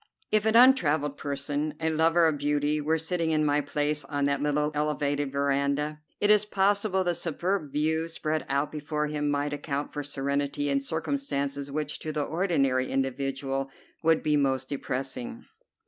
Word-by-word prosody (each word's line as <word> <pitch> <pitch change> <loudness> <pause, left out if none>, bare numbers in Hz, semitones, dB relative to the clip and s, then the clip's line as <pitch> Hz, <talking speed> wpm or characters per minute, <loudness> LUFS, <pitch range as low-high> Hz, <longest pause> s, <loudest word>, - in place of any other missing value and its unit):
If 215 0 +3
an 220 - +2
untravelled 155 - +5
person, 145 +2 -3
a 160 0 0
lover 165 +2 +4
of 155 -3 +1
beauty, 145 +1 +1
were 160 +2 +1
sitting 165 +1 -1
in 155 -1 +2
my 145 0 +2
place 150 +1 -1
on 145 0 -1
that 140 0 0
little 150 +1 +1
elevated 145 -1 -1
veranda, 140 +2 0 0.2
it 205 - +4
is 210 -1 +6
possible 200 -1 +1
the 175 -1 +1
superb 170 -1 -2
view 160 +2 0
spread 155 -1 -2
out 140 +2 0
before 150 0 -2
him 150 -1 -1
might 145 0 0
account 145 -1 -3
for 145 - -3
serenity 140 0 -1
in 140 0 +1
circumstances 140 -2 -2
which 150 +1 -3
to 155 - -4
the 150 -1 -1
ordinary 140 -7 +1
individual 135 0 -2 0.3
would 160 -1 +3
be 150 -1 +2
most 135 -2 +1
depressing. 145 - -4
150 Hz, 165 wpm, -27 LUFS, 140-160 Hz, 0.3 s, is